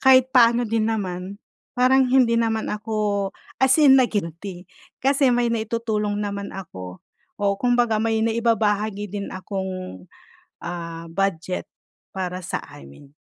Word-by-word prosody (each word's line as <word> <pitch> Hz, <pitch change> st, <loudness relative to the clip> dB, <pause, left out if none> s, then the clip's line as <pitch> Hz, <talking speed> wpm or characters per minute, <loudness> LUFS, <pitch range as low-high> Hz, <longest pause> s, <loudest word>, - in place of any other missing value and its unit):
kahit 260 Hz, -1 st, +6 dB
paano 240 Hz, -1 st, +5 dB
din 220 Hz, -1 st, 0 dB
naman 190 Hz, -3 st, -3 dB, 0.4 s
parang 255 Hz, +1 st, +4 dB
hindi 250 Hz, -2 st, +4 dB
naman 225 Hz, -1 st, 0 dB
ako 210 Hz, -2 st, -1 dB, 0.3 s
as 265 Hz, 0 st, +5 dB
in 270 Hz, -2 st, +8 dB
na-guilty 190 Hz, -5 st, -2 dB, 0.4 s
kasi 275 Hz, 0 st, +3 dB
may 240 Hz, -1 st, +1 dB
naitutulong 220 Hz, -2 st, -1 dB
naman 200 Hz, 0 st, -4 dB
ako 95 Hz, -, -9 dB, 0.4 s
o -, -, -1 dB
kumbaga 240 Hz, -3 st, +2 dB
may 220 Hz, 0 st, +1 dB
naibabahagi 215 Hz, -3 st, +1 dB, 0.2 s
din 200 Hz, -, -5 dB
akong, 185 Hz, -, -5 dB, 0.6 s
ah, 170 Hz, -1 st, -6 dB
budget 185 Hz, -1 st, -2 dB, 0.4 s
para 185 Hz, -1 st, -4 dB
sa 180 Hz, -, -3 dB, 0.2 s
amin. 70 Hz, -, -14 dB
210 Hz, 120 wpm, -23 LUFS, 185-235 Hz, 0.6 s, in